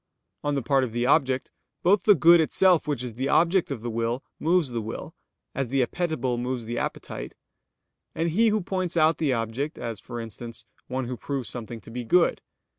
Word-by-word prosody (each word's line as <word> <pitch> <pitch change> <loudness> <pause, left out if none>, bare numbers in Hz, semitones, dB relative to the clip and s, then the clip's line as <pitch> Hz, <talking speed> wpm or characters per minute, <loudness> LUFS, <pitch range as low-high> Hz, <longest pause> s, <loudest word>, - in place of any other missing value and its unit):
On 145 0 0
the 135 - -1
part 135 +2 +3
of 120 -3 -3
the 120 +1 0
object, 130 -2 +2 0.3
both 195 +3 +4
the 205 - +7
good 170 -1 +7
itself 175 +1 +3
which 140 -5 -1
is 125 -2 -5
the 130 +4 -2
object 175 +2 +3
of 130 -6 -5
the 120 - -2
will, 115 +3 -1 0.2
moves 165 -2 +2
the 120 -2 -3
will, 110 +1 -6 0.4
as 135 -3 -2
the 135 -1 +2
appetible 130 -7 -2
moves 125 -1 -3
the 120 +1 -3
appetite; - - -5 0.8
and 165 +1 0
he 225 +7 +4
who 215 -1 +2
points 185 -2 -2
out 160 0 +4
the 150 -4 +1
object, 120 +6 -2
as, 115 -3 -5
for 120 - -7
instance, 115 +1 -7 0.2
one 130 0 -2
who 125 +1 -5
proves 135 -2 -4
something 115 -1 -6
to 115 - -12
be 125 +1 -4
good. 170 +9 +3
130 Hz, 200 wpm, -26 LUFS, 120-165 Hz, 0.8 s, the